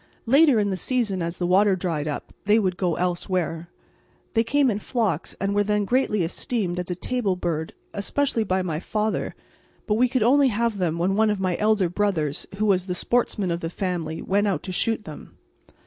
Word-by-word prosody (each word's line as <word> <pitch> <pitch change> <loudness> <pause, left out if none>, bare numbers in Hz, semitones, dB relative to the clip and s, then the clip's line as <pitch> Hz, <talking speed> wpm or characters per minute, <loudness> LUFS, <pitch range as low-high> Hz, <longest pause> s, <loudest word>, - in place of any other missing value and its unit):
Later 275 +2 +5
in 205 -2 +1
the 190 - -2
season, 215 -4 -1
as 170 +1 -3
the 175 - -1
water 190 +2 +4
dried 165 -5 -2
up, 150 - -5
they 210 +2 +5
would 190 -5 +1
go 180 -3 0
elsewhere. 175 -2 -2 0.6
They 225 -2 +3
came 270 +2 +2
in 205 - -2
flocks 215 - -1
and 195 0 0
were 205 0 +3
then 210 0 0
greatly 215 -4 +1
esteemed 180 +1 -2
as 180 - -4
a 180 - -1
table 205 0 -1
bird, 165 -3 -3 0.2
especially 230 +3 0
by 190 -2 0
my 160 -4 -2
father, 215 +4 -2 0.5
but 210 - +1
we 250 0 +4
could 255 -3 +1
only 275 +4 +5
have 230 -2 0
them 170 -3 0
when 185 +3 +1
one 220 +1 +3
of 210 -2 0
my 185 -2 0
elder 210 -3 +2
brothers, 170 -6 -1
who 215 +2 0
was 190 -2 +2
the 180 - -2
sportsman 210 -3 0
of 170 - -1
the 165 - -4
family, 170 -3 -3
went 205 +2 +1
out 195 - -1
to 185 - -5
shoot 225 +4 0
them. 155 -8 -11
195 Hz, 205 wpm, -24 LUFS, 175-220 Hz, 0.6 s, Later